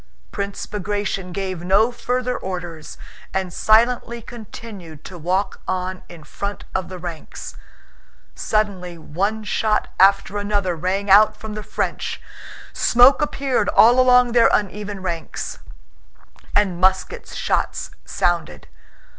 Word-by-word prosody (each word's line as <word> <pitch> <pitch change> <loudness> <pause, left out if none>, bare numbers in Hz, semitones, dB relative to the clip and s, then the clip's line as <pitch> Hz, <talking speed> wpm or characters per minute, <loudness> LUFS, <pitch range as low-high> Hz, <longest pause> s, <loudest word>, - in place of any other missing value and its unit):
Prince 200 0 -4
Bagratión 205 -2 -3
gave 185 -2 -4
no 200 +6 +3
further 250 +1 -2
orders 175 -4 -6 0.4
and 190 -2 -1
silently 235 +3 +3
continued 210 -8 -10
to 185 - -9
walk 185 +4 -1
on 185 0 -2
in 170 -3 -11
front 200 +4 -5
of 190 - -2
the 185 - -7
ranks. 170 -3 -8 0.8
Suddenly 190 - -1
one 200 +8 -2
shot 215 0 0
after 195 +1 +4
another 205 -3 0
rang 185 +4 -1
out 210 +2 +7
from 220 -1 -7
the 215 - -5
French, - - -3 0.5
smoke 250 +5 +5
appeared 275 -3 0
all 240 +3 +6
along 250 -1 +5
their 230 -1 +5
uneven 205 -1 -2
ranks, 170 -3 -4 1.0
and 190 -4 +1
musket 190 - +1
shots - - -2
sounded. 170 - -1
200 Hz, 120 wpm, -21 LUFS, 180-220 Hz, 1.0 s, out